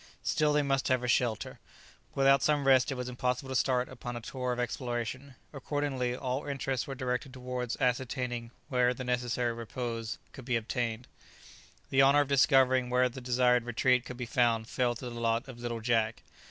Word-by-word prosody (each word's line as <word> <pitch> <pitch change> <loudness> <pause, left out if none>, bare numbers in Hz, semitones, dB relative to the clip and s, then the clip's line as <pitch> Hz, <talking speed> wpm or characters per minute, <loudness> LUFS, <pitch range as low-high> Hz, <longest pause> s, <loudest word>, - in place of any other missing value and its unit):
Still 150 -1 +2
they 150 0 +3
must 135 -1 0
have 130 -1 +1
a - - -1
shelter. 115 -2 0 0.6
Without 135 0 +5
some 145 -2 +2
rest 135 0 +5
it - - -2
was 125 -1 -4
impossible 125 +1 -2
to 130 - -3
start 125 -1 +2
upon 120 0 -7
a - - -3
tour 125 +2 -4
of 125 - -2
exploration; 125 +2 -3 0.2
accordingly, 135 -3 -2
all 130 +2 -3
interests 135 -2 -2
were 135 - -5
directed 130 +1 -3
towards 125 -2 -4
ascertaining 125 -1 -1 0.2
where 125 -2 +2
the 130 - -5
necessary 125 -1 0
repose 115 -1 -4
could 130 - -11
be 125 -1 0
obtained. 115 +1 -2 0.8
The 135 - +5
honour 140 +2 +6
of 145 - -1
discovering 130 -2 +4
where 125 0 +3
the 130 +1 -9
desired 125 0 +3
retreat 125 +1 +2
could 125 - -8
be 125 - -4
found 115 -1 +1
fell 120 -1 0
to 125 - -8
the 120 - -5
lot 115 +3 0
of 125 -3 -10
little 120 -1 -4
Jack. 115 -1 0
125 Hz, 185 wpm, -30 LUFS, 120-130 Hz, 0.8 s, honour